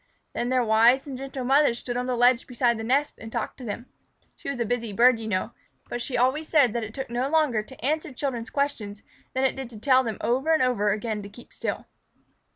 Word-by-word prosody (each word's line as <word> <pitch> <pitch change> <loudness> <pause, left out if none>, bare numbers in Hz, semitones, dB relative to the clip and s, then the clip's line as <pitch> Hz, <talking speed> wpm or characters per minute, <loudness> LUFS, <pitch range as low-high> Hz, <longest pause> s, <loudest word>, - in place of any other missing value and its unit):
Then 240 - -2
their 255 -1 +2
wise 230 +4 +4
and 275 -3 -6
gentle 265 0 -5
mother 275 -1 +4
stood 240 +1 -5
on 250 +1 -2
the 250 -1 -1
ledge 245 +1 +4
beside 240 -2 +1
the - - -4
nest 275 +6 +1
and 225 0 -9
talked 235 +3 -4
to - - -8
them. 235 +1 -5 0.5
She - - -7
was 280 -3 -3
a 235 - +1
busy 230 -1 -2
bird, 240 +2 +5
you 220 - -6
know, 185 -3 -1 0.4
but 240 - -3
she 245 - -2
always 265 +6 +1
said 280 -8 +4
that 235 -1 -2
it 220 +1 -7
took 265 -3 -5
no 250 +3 -1
longer 295 -8 +2
to 250 +2 -10
answer 310 +2 0
children's 245 -3 -3
questions 225 -7 -2 0.3
than 260 - +1
it 265 - +2
did 265 -2 -6
to 225 -3 -11
tell 260 +3 +4
them 225 -4 -3
over 270 +7 +1
and 310 - +2
over 210 -5 +2
again 215 0 -2
to 200 - -9
keep 240 +4 -15
still. - - -4
245 Hz, 240 wpm, -26 LUFS, 225-265 Hz, 0.5 s, bird